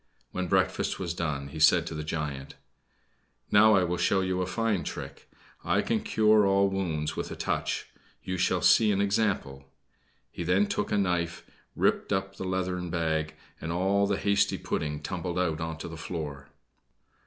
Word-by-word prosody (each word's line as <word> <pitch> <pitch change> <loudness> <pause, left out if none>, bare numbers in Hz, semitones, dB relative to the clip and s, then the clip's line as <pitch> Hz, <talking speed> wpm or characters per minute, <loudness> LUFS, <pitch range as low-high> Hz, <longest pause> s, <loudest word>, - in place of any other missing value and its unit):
When 95 0 -3
breakfast - - +1
was 85 -3 -3
done, 75 -5 -3
he 80 - -8
said 85 +2 +5
to 85 - -5
the 75 -1 -4
giant: 75 -3 -4 1.0
"Now 110 +1 +7
I 95 - +4
will 90 0 -1
show 95 - +2
you 95 0 -1
a 90 - -1
fine 110 -2 0
trick. - - -7 0.3
I - - +1
can - - 0
cure 110 -1 +4
all 100 0 +3
wounds 80 -6 -2
with - - -4
a - - -6
touch. - - -2 0.4
You 95 - -3
shall 90 -1 +1
see 110 -2 +5
an 100 - +1
example." 100 -10 -1 0.6
He - - -7
then 90 +4 +3
took - - -2
a - - +2
knife, 90 -3 -1 0.3
ripped - - +1
up 95 0 -1
the - - -5
leathern 90 -1 -2
bag, 80 -2 -1 0.3
and 80 - -3
all 95 +3 +2
the 100 -1 0
hasty 100 0 +2
pudding 75 -1 -3
tumbled 90 +1 -3
out 85 -3 0
upon 80 0 -3
the 80 - -8
floor. 75 -4 -6
90 Hz, 175 wpm, -28 LUFS, 80-95 Hz, 1.0 s, Now